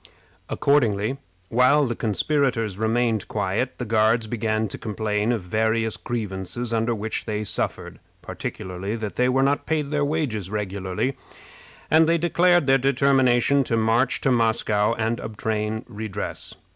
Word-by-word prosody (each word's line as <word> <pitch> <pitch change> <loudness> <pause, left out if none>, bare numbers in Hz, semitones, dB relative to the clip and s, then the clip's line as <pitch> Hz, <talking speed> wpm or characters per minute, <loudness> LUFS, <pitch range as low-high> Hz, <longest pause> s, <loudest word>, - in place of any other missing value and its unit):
Accordingly, 130 -4 +1 0.3
while 130 +5 +4
the 120 -2 -2
conspirators 115 - 0
remained 110 -1 0
quiet, - - -2
the 125 - -4
Guards 110 +1 +2
began 110 -1 -1
to - - -7
complain 105 0 -1
of 115 -6 -1
various 110 +3 0
grievances 115 +1 -4
under 115 +1 +1
which 110 +1 -3
they 110 -1 -2
suffered, 105 - -3 0.2
particularly 95 +3 -5
that 105 -5 -5
they 125 +3 +2
were 135 +1 +2
not 140 +1 +1
paid 150 -2 -1
their 150 -1 +1
wages 140 - -2
regularly, 100 +4 -2 0.8
and 160 +1 +6
they 170 - +4
declared 175 0 +3
their 135 0 +4
determination 135 0 +3
to 115 - 0
march 115 +3 +2
to 135 - +2
Moscow 110 -2 +2
and 115 +1 -1
obtain 110 0 -3
redress. 110 -3 -5
115 Hz, 140 wpm, -24 LUFS, 105-135 Hz, 0.8 s, and